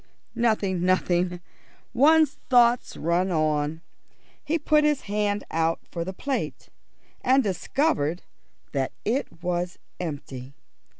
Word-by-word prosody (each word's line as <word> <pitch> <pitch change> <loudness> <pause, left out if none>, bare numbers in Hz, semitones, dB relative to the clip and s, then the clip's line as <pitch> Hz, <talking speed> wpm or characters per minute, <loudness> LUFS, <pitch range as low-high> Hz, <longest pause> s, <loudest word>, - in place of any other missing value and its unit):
"Nothing, 210 -6 +1
nothing. 180 -1 +1 0.5
One's 300 +3 +4
thoughts 245 -1 +4
run 170 +4 +1
on." 155 -1 0 0.6
He 305 +3 0
put 300 0 +3
his 300 -2 +2
hand 205 0 -1
out 165 0 +1
for 170 - -3
the 185 - -4
plate, 270 +8 -4 0.5
and 265 +1 +4
discovered 185 - 0 0.5
that 135 -2 -1
it 220 - -2
was 175 0 -2 0.2
empty. 140 -5 -6
185 Hz, 110 wpm, -25 LUFS, 165-245 Hz, 0.6 s, One's